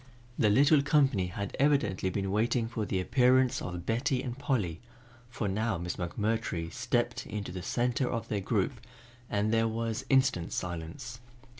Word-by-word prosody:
The 105 - +4
little 140 +7 +5
company 135 - +3
had 100 +2 -5
evidently 120 -10 +2
been 95 +1 -2
waiting 115 +3 +1
for 110 -3 -3
the 95 - 0
appearance 130 +5 +3
of 90 -1 -5
Betty 125 +4 0
and 120 -2 -4
Polly, 115 - -1 0.5
for 115 -3 -3
now 110 +1 0
Miss 85 +1 -4
McMurtry 90 -2 -2
stepped 120 0 -1
into 105 -3 -5
the 90 0 -5
center 125 +6 0
of 115 -2 -3
their 105 -3 -1
group 110 +5 -1 0.5
and 105 +2 0
there 115 0 +3
was 115 0 -2
instant 130 -10 +2
silence. 90 - -5
115 Hz, 155 wpm, -30 LUFS, 95-125 Hz, 0.5 s, little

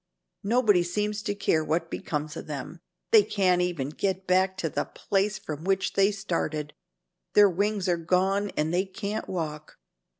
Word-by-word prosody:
Nobody 210 -3 +4
seems 210 +4 -2
to 205 -1 -2
care 160 -5 +1
what 165 +2 -1
becomes 150 0 -3
of - - -7
them. 150 +3 -6 0.3
They 220 - +8
can't 195 -4 +2
even 170 -7 -1
get 190 +4 -2
back 190 +1 +2
to 175 - -1
the - - -2
place 200 +1 -1
from 155 -5 -7
which 195 +1 0
they 195 0 +4
started. 165 -6 -3 0.6
Their 205 -1 +8
wings 200 +1 0
are 175 -1 +2
gone 190 +4 +1
and 155 +2 0
they 185 +2 +2
can't 205 +2 -5
walk. 155 -4 -5
185 Hz, 165 wpm, -27 LUFS, 165-200 Hz, 0.6 s, They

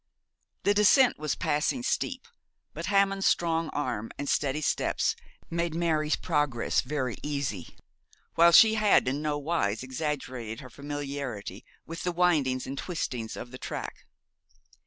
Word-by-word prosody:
The 205 - +4
descent 210 - +5
was 155 -2 -1
passing 150 - 0
steep, 365 - -2 0.5
but - - -5
Hammond's 195 -1 +2
strong 165 -1 +1
arm 125 -6 -3
and 145 - -4
steady 145 +2 0
steps - - 0 0.3
made 170 -1 -2
Mary's 160 -3 +1
progress 145 -7 0
very 130 -3 -3
easy, 140 - -4 0.6
while 170 +1 +6
she 220 +5 +8
had 215 -9 +4
in 135 +3 -1
no 150 -1 -1
wise 140 -8 -1
exaggerated 130 -5 -4
her 130 -3 -12
familiarity 140 -7 -5 0.2
with 165 +1 -7
the 180 - -1
windings 155 -8 +2
and 135 - -5
twistings 125 -10 -4
of 120 - -8
the 130 - -9
track. - - -6
150 Hz, 135 wpm, -28 LUFS, 130-170 Hz, 0.6 s, she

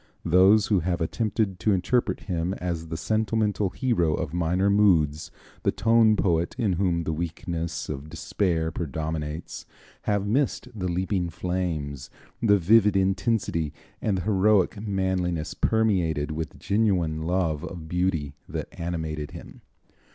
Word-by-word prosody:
Those 95 +5 +5
who 100 -4 +2
have 85 +1 -1
attempted 100 +2 -1
to 105 +4 +2
interpret 95 +2 0
him 90 0 -2
as 85 -2 -4
the 80 0 -4
sentimental 105 +2 0
hero 90 - +1
of 80 -4 -4
minor 90 +3 +1
moods, 85 -8 +3 0.3
the - - +2
tone 115 -1 +4
poet 85 -4 +1
in 110 -7 +1
whom 85 -2 0
the 80 - -2
weakness 85 0 -4
of 70 +3 -6
despair 80 0 -1
predominates, 80 0 -4 0.4
have 100 -1 +1
missed 125 +4 0
the 95 -4 -3
leaping 90 0 -1
flames, 80 -7 -3 0.3
the 105 -3 +5
vivid 105 +2 +4
intensity 95 -5 0 0.3
and 100 -3 0
the 90 - -3
heroic 100 -1 +2
manliness 95 -5 -1
permeated 90 -9 +1
with 80 0 -5
genuine 95 -7 +1
love 80 -3 0
of 85 -3 -7
beauty 85 -5 -1 0.2
that - - -4
animated 80 -3 -4
him. - - -11
90 Hz, 135 wpm, -26 LUFS, 80-100 Hz, 0.4 s, Those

